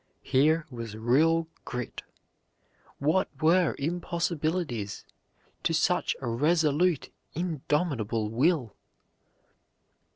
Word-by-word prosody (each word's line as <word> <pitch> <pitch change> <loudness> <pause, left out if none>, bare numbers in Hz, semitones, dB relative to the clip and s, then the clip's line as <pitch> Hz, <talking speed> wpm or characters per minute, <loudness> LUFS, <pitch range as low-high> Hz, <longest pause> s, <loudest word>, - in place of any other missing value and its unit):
Here 155 +4 +3
was 115 -3 -6
real 160 +9 +3 0.2
grit. 125 0 -5 1.0
What 160 +7 +1
were 170 +2 +3
impossibilities 160 - -2 0.6
to - - +1
such - - +1
a - - -3
resolute, 155 +5 +2 0.2
indomitable 145 - -1
will? 130 - +1
150 Hz, 75 wpm, -28 LUFS, 120-170 Hz, 1.0 s, Here